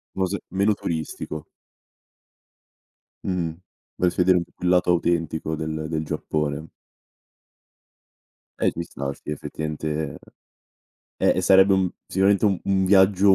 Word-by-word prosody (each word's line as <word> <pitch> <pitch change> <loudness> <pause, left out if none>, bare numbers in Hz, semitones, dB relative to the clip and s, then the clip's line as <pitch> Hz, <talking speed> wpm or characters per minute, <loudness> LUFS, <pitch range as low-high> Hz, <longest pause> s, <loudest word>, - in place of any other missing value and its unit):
Mose 95 +1 -1
meno 100 +3 +2
turistico. 80 -2 -4 1.8
Mh-mh, 90 -3 -1 0.4
vorresti 90 0 +1
vedere 90 0 +5
un 85 - -2
pò - - -31
più 90 - -4
il 90 - +3
lato 90 0 +3
autentico 85 -2 0
del 80 0 -3
del 80 -1 -1
Giappone. 75 0 -2 1.9
Eh - - +3
ci 85 - -4
sta, 70 -4 -5
sì, - - -8
effettivamente, 75 0 -4 1.0
eh, - - +3
e - - +2
sarebbe 95 +2 +6
un 95 -2 +2 0.2
sicuramente 100 +2 +2
u 100 -3 +3
un 95 -1 +2
viaggio, 95 0 +5
90 Hz, 125 wpm, -24 LUFS, 80-95 Hz, 1.9 s, sarebbe